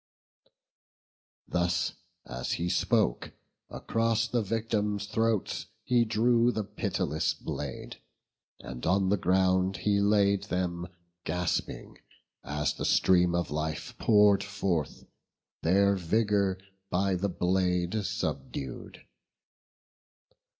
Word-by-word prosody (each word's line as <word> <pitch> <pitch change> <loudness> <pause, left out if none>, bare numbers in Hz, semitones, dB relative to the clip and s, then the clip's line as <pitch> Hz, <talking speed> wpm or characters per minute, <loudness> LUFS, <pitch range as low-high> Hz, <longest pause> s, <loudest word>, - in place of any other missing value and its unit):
Thus 85 0 0 0.3
as 60 0 -4
he 85 +1 -2
spoke, 75 -8 +1 0.4
across 115 0 0
the 120 0 0
victims' 105 -1 -1
throats 110 -1 -1 0.2
He 120 -2 +3
drew 120 +2 +3
the 110 - -2
pitiless 95 -6 -2
blade, 70 -3 -6 0.6
and 60 -2 -9
on 95 +2 +2
the 105 - +3
ground 95 0 +2
He 100 +2 +1
laid 100 -1 +3
them 90 -1 -2 0.4
gasping, 90 +2 -3 0.4
as 75 +1 -1
the - - -6
stream 90 -1 +3
of 85 -3 -1
life 80 +1 -3
Pour'd 105 -2 +5
forth, 95 -7 -2 0.6
their 100 +4 +3
vigour 100 +1 +1 0.3
by 95 +2 +1
the 95 +2 -1
blade 90 +2 0
subdued. 95 - -5
95 Hz, 100 wpm, -29 LUFS, 90-105 Hz, 0.6 s, Pour'd